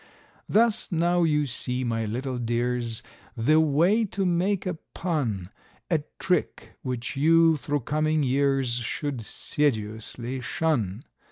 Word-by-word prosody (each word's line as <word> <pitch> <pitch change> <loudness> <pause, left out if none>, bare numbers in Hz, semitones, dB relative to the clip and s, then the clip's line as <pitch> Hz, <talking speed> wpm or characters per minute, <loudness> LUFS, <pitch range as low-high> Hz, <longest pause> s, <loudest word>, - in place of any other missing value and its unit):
Thus 225 -1 +3
now 175 +1 +2
you 150 -3 +2
see, 125 0 -2
my 115 -2 -1
little 125 +4 -3
dears, 120 -1 -1 0.3
the 150 +8 +4
way 165 +9 +3
to 195 -1 -2
make 180 +3 +1
a 180 -4 -3 0.2
pun; 115 - -2 0.4
A 165 - +4 0.2
trick 180 -1 -1
which 125 -1 -4
you, 165 +3 +5
through 145 +1 -2
coming 155 +3 +1
years, 135 -1 +2
should 125 +2 -3
sedulously 120 0 -2
shun. 120 - -1
140 Hz, 120 wpm, -26 LUFS, 120-165 Hz, 0.4 s, you